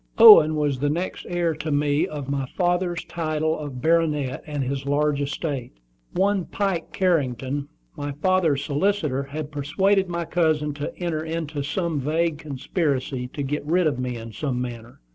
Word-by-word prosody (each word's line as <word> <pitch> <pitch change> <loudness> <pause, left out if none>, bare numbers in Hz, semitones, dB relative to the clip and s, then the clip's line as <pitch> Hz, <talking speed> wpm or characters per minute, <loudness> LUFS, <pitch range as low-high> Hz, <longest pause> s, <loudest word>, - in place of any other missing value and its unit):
Owen 210 -9 +9
was 145 -3 0
the 145 +2 +1
next 175 +5 -3
heir 175 -2 +1
to 155 +1 -5
me 145 +1 +2
of 145 -3 -6
my 140 -1 -2
father's 175 -1 0
title 155 -1 -1
of 140 -4 -6
baronet 155 -5 +1
and 145 -2 -2
his 135 +1 -3
large 145 0 +1
estate. 140 - -3 0.4
One 195 -1 +1
Pike 195 -5 -2
Carrington, 140 -5 0 0.3
my 145 0 -4
father's 155 -3 +1
solicitor, 150 -2 0
had 145 +2 -6
persuaded 190 +7 +1
my 170 -1 -2
cousin 155 -3 +1
to 145 0 -5
enter 165 -3 -2
into 160 -2 -3
some 160 +2 -1
vague 155 +3 0
conspiracy 140 -3 -2
to 140 +3 -5
"get 145 +2 -2
rid 175 +4 +2
of 145 -4 +1
me 125 -1 -2
in 115 0 -8
some 130 +2 -2
manner." 120 - -7
150 Hz, 160 wpm, -24 LUFS, 140-170 Hz, 0.4 s, Owen